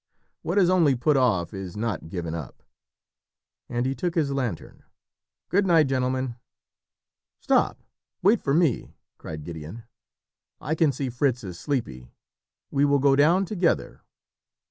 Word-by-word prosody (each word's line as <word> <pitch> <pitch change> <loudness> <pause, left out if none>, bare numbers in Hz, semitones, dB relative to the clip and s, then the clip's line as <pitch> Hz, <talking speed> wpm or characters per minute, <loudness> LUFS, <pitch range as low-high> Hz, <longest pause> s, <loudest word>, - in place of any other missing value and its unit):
"What 175 +5 -2
is 190 -3 +5
only 170 -7 +4
put 135 +5 +2
off 105 -11 +1
is 95 -1 -7
not 105 -7 -3
given 85 -3 -4
up." 80 -5 -8 1.1
And 120 0 -1
he 135 - 0
took 170 +7 -3
his 150 -5 +1
lantern. 125 -10 -4 0.7
"Good 195 +1 +2
night, 165 -3 +5
gentlemen." 130 -2 -1 1.0
"Stop - - +1 0.4
wait 205 +4 +4
for 140 0 +1
me," 160 -7 +1 0.2
cried 75 -1 -7
Gideon. 85 +7 -8 0.8
"I 150 - -2
can 160 -2 +3
see 130 -1 -4
Fritz 125 -1 0
is 90 -3 -7
sleepy; 65 - -3 0.6
we 140 0 +2
will 145 0 +4
go 140 0 +4
down 170 +7 +4
together." 185 -3 -1
130 Hz, 140 wpm, -25 LUFS, 105-155 Hz, 1.1 s, is